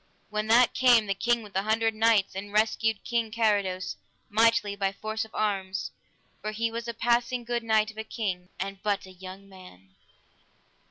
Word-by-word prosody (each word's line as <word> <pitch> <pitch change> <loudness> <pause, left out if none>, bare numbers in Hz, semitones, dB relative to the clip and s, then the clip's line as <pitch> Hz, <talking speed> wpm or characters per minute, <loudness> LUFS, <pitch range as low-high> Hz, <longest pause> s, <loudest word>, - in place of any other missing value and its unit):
With 215 0 -2
that 235 +2 +5
came 245 -4 +5
the 200 - 0
King 235 +3 0
with 205 -2 -13
the 190 - +1
Hundred 225 +2 +1
Knights 220 -2 +3
and 200 +1 -6
rescued 220 0 +1
King 235 -2 -1
Carados 205 -5 0 0.3
mightily 220 -1 +3
by 195 -1 0
force 215 +3 -4
of 220 - -16
arms, 195 -3 -1 0.5
for 215 - -3
he 230 +1 -1
was 235 +1 -5
a 235 - -3
passing 240 +2 +1
good 240 0 -2
knight 220 -1 +2
of 220 - -11
a - - -2
king, 190 -5 -4
and 195 0 -4
but 205 -2 -1
a 190 - -12
young 190 +2 -10
man. 140 - -15
215 Hz, 180 wpm, -27 LUFS, 195-230 Hz, 0.5 s, that